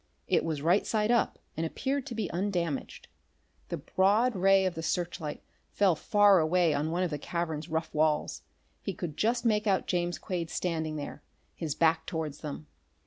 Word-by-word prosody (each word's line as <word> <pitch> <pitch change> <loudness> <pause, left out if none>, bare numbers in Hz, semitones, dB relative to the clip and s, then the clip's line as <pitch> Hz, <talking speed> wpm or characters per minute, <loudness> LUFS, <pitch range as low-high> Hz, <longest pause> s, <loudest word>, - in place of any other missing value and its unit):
It - - +2
was 155 -3 -3
right 175 +5 +4
side 215 0 +1
up, 235 - +2 0.2
and 160 - -2
appeared 270 - -2
to 240 - -5
be 215 -4 -1
undamaged. 175 -5 -2 0.6
The - - -2
broad 210 +6 +2
ray 195 +1 +4
of 185 - 0
the 165 - -5
searchlight 165 -2 -3 0.3
fell 195 -3 +3
far 205 +2 +5
away 165 0 +3
on 145 +2 0
one 175 +3 0
of 175 - -1
the 150 - -3
cavern's 160 -1 -3
rough 160 +1 -2
walls. 155 0 +1 0.4
He 195 - -4
could 160 -4 -5
just 235 +5 +1
make 215 -1 +2
out 195 -2 +2
James 175 -1 -1
Quade 170 -3 -4
standing 160 -3 -2
there, 145 0 -6 0.3
his 155 -4 -4
back 160 -1 +2
towards 160 -4 -4
them. 150 0 -6
175 Hz, 180 wpm, -29 LUFS, 160-195 Hz, 0.6 s, far